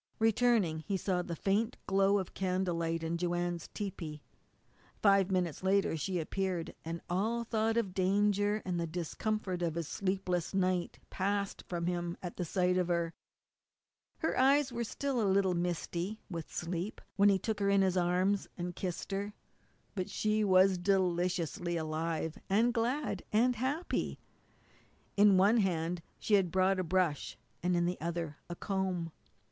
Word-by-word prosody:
Returning 220 -7 +3
he 195 +5 -2
saw 185 -1 0
the 170 -1 -5
faint 210 +7 0
glow 195 +1 +3
of 190 -3 -4
candlelight 175 -3 -1
in 165 +1 -2
Joanne's 175 -1 -1
tepee. 170 -7 -6 0.8
Five 195 -2 +4
minutes 180 -4 0
later 195 -2 +2
she 180 +4 -2
appeared, 180 +1 -2
and 165 +1 -5
all 220 +6 0
thought 225 0 0
of 200 -6 0
danger, 205 +2 +2
and 180 -2 -1
the 170 - -1
discomfort 180 +3 -2
of 165 -2 -1
his 170 -3 -2
sleepless 185 -2 -1
night, 185 -2 0
passed 200 +1 -1
from 170 -1 -2
him 175 -1 -2
at 180 0 -4
sight 180 +1 +2
of 180 - +1
her. 170 -1 0 1.0
Her 320 - -1
eyes 270 +1 +4
were 235 0 -2
still 265 +2 -2
a 205 - +2
little 190 -1 +3
misty 175 +3 -2
with 165 -3 -5
sleep 175 +4 -3 0.2
when 200 0 +5
he 195 - +4
took 215 +3 -3
her 200 -1 +2
in 200 -1 +4
his 190 -1 +2
arms 185 +3 +2
and 175 0 -4
kissed 180 +1 -4
her, 200 +1 -3 0.6
but 185 -3 -3
she 215 0 +1
was 190 -1 +5
deliciously 175 -2 0
alive, 160 0 -2
and 225 +5 +3
glad, 250 +5 -1
and 245 +4 +3
happy. 280 +8 -1 1.0
In 205 -1 +6
one 200 +5 +5
hand 175 -4 0 0.2
she 215 - -2
had 195 -3 +5
brought 185 +1 +2
a - - +1
brush 175 -4 0 0.2
and 180 +1 +1
in 175 - +2
the 180 +1 -2
other 165 -2 -3
a 175 - -4
comb. 185 -4 -2
185 Hz, 155 wpm, -32 LUFS, 175-205 Hz, 1.0 s, In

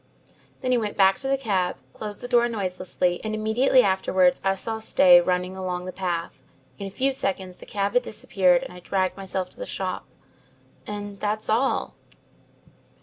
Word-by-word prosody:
"Then 255 -2 -1
he 250 - +3
went 210 -2 -4
back 195 0 +5
to 270 - -5
the 275 0 +2
cab, 195 -8 0 0.2
closed 210 -1 -6
the 245 - -5
door 240 -1 +3
noiselessly, 185 -4 -2
and 215 0 -2
immediately 240 +4 +3
afterwards 190 -2 +2
I 195 0 +2
saw 220 +3 -3
Stay 180 -5 +6
running 180 +1 -1
along 180 -1 -4
the 185 - -5
path. 175 -3 -4 0.4
In 200 - -4
a - - -5
few 265 +7 0
seconds 190 -6 -2
the - - -14
cab 200 -1 -1
had 245 - +4
disappeared 185 -6 +1
and - - -8
I 180 - -10
dragged 185 +1 -1
myself 190 -1 -4
to - - -15
the - - -5
shop - - -3 0.8
and 205 -1 -6
that's 215 +1 -2
all." 235 +5 +1
195 Hz, 180 wpm, -25 LUFS, 185-220 Hz, 0.8 s, Stay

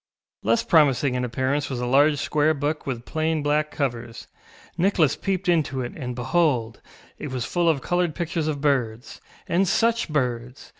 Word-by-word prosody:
Less 115 +2 +2
promising 140 -4 +3
in 125 0 -1
appearance 130 +4 -1
was 130 -3 -3
a 125 - -2
large 145 +4 +4
square 150 +3 +1
book 145 +2 -3
with 120 -3 -4
plain 160 -1 -1
black 150 +1 +1
covers; 120 -6 -4 0.5
Nicholas 170 -5 +2
peeped 195 -1 -2
into 150 -6 +1
it, 120 - -5
and, 125 -5 -5
behold, 125 -3 0 0.4
it 150 - -5
was 130 -2 -3
full 175 -1 +1
of 150 -4 +1
coloured 175 -3 0
pictures 165 -2 -2
of 145 -2 -2
birds. 125 -5 -1 0.3
And 185 +3 +2
such 230 +2 +1
birds! 125 -3 -3
145 Hz, 165 wpm, -24 LUFS, 125-160 Hz, 0.5 s, large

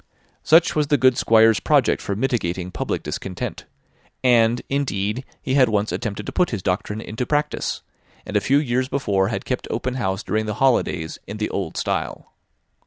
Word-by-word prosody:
Such 165 +2 +5
was 150 -1 +1
the 145 0 +3
good 130 -1 +4
Squire's 110 -1 +4
project - - +2
for 100 - -3
mitigating 95 -7 -1
public - - -3
discontent; 95 -2 -5 0.6
and, 120 -1 +4
indeed, 125 -4 -1 0.2
he 130 - -1
had 130 -3 +5
once 105 0 0
attempted 105 -1 -4
to - - -5
put 180 - +1
his 105 -6 -4
doctrine 100 +3 -2
in 110 - -8
practice, 150 +4 -1 0.4
and - - -7
a - - +4
few 140 - +3
years 130 -3 0
before 100 -9 0
had 115 - -3
kept 125 - -3
open 125 +2 -2
house 95 -7 -2
during 110 0 -1
the 105 - -2
holidays 115 -11 +1
in 105 - -6
the 105 - -2
old 95 -5 -3
style. - - -3
115 Hz, 175 wpm, -22 LUFS, 100-130 Hz, 0.6 s, Such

